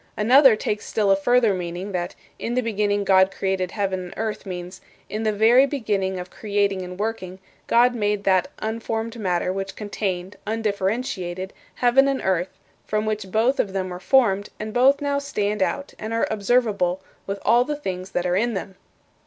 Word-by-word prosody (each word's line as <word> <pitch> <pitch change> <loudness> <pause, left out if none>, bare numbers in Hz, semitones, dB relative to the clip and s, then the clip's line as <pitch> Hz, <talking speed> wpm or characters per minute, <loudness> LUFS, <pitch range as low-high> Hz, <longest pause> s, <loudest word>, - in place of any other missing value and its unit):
" - - -38
Another 265 -1 +7
takes 210 0 -3
still 205 -3 +1
a - - +6
further 230 +2 +3
meaning, 180 +2 -4
that 175 -2 -3 0.2
"In 235 - -3
the 255 - +1
beginning 205 -2 0
God 190 -1 +5
created 190 -1 -2
heaven 195 -2 -2
and 175 - -9
earth" 220 -2 -3
means, 180 0 -7 0.3
"In 215 - -2
the 220 -1 +1
very 230 +6 +5
beginning 200 -9 -1
of 180 0 -8
creating 200 -2 0
and 180 +1 -8
working, 205 -4 -3 0.3
God 245 +1 +4
made 210 -3 -1
that 185 -2 +3
unformed 225 +1 -3
matter 180 -2 0
which 195 0 -4
contained, 195 -3 -4
undifferentiated, 200 -3 -2 0.2
heaven 255 +3 +4
and 275 -1 0
earth, 185 -1 +1 0.3
from 215 0 -1
which 215 -3 -3
both 235 +7 +2
of 195 - 0
them 190 -1 -2
were 180 0 -6
formed, 205 -2 +2
and 215 0 -5
both 270 +4 +4
now 285 -1 0
stand 210 -7 -2
out 280 +8 -1
and 220 +1 -4
are 230 - +2
observable 200 -4 +1 0.2
with 195 0 -2
all 240 +1 +5
the 295 +3 -3
things 185 -9 -5
that 180 - -2
are 180 0 +1
in 230 +3 +1
them." 190 0 -6
205 Hz, 185 wpm, -23 LUFS, 190-230 Hz, 0.3 s, Another